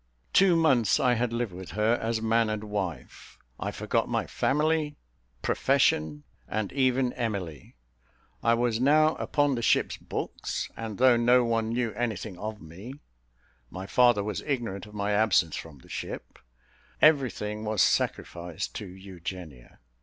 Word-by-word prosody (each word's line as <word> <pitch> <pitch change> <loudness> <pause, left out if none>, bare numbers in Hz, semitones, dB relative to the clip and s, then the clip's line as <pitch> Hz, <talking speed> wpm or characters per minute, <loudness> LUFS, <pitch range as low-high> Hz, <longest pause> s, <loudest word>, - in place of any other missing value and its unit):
Two 190 -2 +5
months 135 - +3
I 125 - +3
had 120 0 0
lived 115 -4 -2
with 95 0 -9
her, 110 +2 +2
as 115 0 -1
man 115 0 +2
and 110 0 -3
wife; 100 -5 -5 0.2
I - - -2
forgot - - -1
my - - 0
family, 150 +1 0 0.5
profession, 75 -1 +1 0.2
and 110 0 -3
even 130 -2 +2
Emily. 95 - -4 0.7
I 115 0 +3
was 115 -1 0
now 155 +4 +4
upon 145 -1 +1
the 120 - -2
ship's - - +2
books; - - -4
and 110 -3 -6
though 125 -2 +5
no 120 +1 +4
one 115 -1 0
knew 120 0 -1
anything 110 -4 -3
of 110 -1 -5
me, 95 +11 -10 0.7
my 95 +7 -7
father 120 -1 +4
was 105 -1 -3
ignorant 115 -9 -3
of 105 - -14
my 100 0 -1
absence 100 -7 +3
from 80 -3 -8
the 65 - -19
ship - - -7 0.6
everything 120 -8 +2
was 110 -3 +2
sacrificed 85 -1 -1
to 105 - -6
Eugenia. 90 -7 -9
110 Hz, 145 wpm, -27 LUFS, 95-125 Hz, 0.7 s, Two